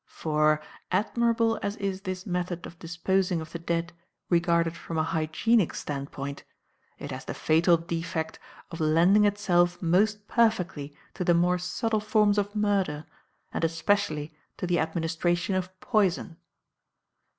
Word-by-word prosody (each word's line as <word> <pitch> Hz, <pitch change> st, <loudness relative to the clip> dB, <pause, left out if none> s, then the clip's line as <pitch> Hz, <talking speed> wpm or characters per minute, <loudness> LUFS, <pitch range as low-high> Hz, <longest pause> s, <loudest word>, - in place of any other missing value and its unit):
For, 155 Hz, -1 st, +1 dB, 0.3 s
admirable 230 Hz, +3 st, +1 dB
as 200 Hz, +1 st, -2 dB
is 195 Hz, -2 st, -3 dB
this 185 Hz, -1 st, -5 dB
method 180 Hz, -2 st, -3 dB
of 170 Hz, -, -11 dB
disposing 180 Hz, +1 st, 0 dB
of 160 Hz, 0 st, -8 dB
the 170 Hz, -, -5 dB
dead 170 Hz, +1 st, -2 dB, 0.4 s
regarded 170 Hz, -1 st, +2 dB
from 165 Hz, 0 st, -6 dB
a 155 Hz, -, +2 dB
hygienic 160 Hz, +6 st, +1 dB
standpoint, 140 Hz, 0 st, -5 dB, 0.5 s
it -, -, -7 dB
has -, -, -6 dB
the -, -, -5 dB
fatal 170 Hz, +2 st, +4 dB
defect 165 Hz, -1 st, -4 dB, 0.3 s
of 165 Hz, -, -7 dB
lending 170 Hz, +7 st, +4 dB
itself 175 Hz, -4 st, +2 dB
most 205 Hz, +4 st, +1 dB
perfectly 180 Hz, -11 st, 0 dB, 0.2 s
to -, -, -3 dB
the 175 Hz, -1 st, +4 dB
more 180 Hz, +1 st, +2 dB
subtle 215 Hz, +5 st, -1 dB
forms 210 Hz, -1 st, +3 dB
of 205 Hz, +1 st, -3 dB
murder, 195 Hz, -8 st, 0 dB, 0.5 s
and -, -, -2 dB
especially 160 Hz, -2 st, 0 dB, 0.2 s
to -, -, -3 dB
the 175 Hz, -1 st, +1 dB
administration 170 Hz, +3 st, 0 dB
of 185 Hz, 0 st, -3 dB
poison. 190 Hz, -6 st, +1 dB
175 Hz, 140 wpm, -27 LUFS, 165-200 Hz, 0.5 s, fatal